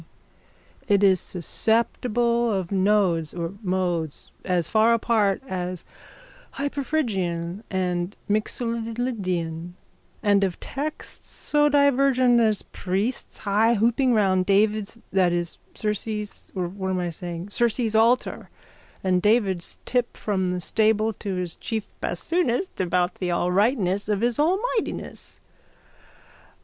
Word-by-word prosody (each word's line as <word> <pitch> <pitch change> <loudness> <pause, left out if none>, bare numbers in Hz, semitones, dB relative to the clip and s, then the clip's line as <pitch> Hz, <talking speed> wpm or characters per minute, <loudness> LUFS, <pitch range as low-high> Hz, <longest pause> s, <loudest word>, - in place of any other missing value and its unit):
_ - - -15 0.8
It 205 -1 +3
is 190 -2 +5
susceptible 235 +5 0
of 190 -3 -2
nodes 190 -5 +2
or 170 +1 -3
modes 180 -5 -2
as 180 -3 0
far 225 +1 +4
apart 220 -2 +1
as 180 -3 -4 0.7
hyperphrygian 210 - -2
and 180 0 -1
mixolydian 215 -7 -2 0.5
and 205 -2 +4
of 185 -3 -1
texts 295 +3 -5
so 295 0 +1
divergent 270 -3 +4
as 220 -3 +2
priests 195 +7 -3
haihooping 230 +4 +3
round 185 -3 +2
David's 210 +2 +2
that 185 -2 +4
is 175 -1 -3 0.2
Circe's 210 0 -4
or 180 -2 -1
what 190 +1 -4
am 185 - 0
I 175 -1 -2
saying 175 +2 -6
Ceres' 235 0 +1
altar 230 +3 +2 0.5
and 185 -1 +2
David's 200 -5 +1
tip 245 -1 -1
from 190 -3 -1
the 180 0 -1
stable 220 +3 +2
to 195 -1 -4
his 180 -2 -3
chief 220 -2 -4
bassoonist 340 - -1
about 180 0 +1
the 180 - -1
alrightness 195 +3 +1
of 205 -1 +1
his 240 +1 0
almightiness. 395 +9 -1
205 Hz, 115 wpm, -24 LUFS, 180-235 Hz, 0.8 s, is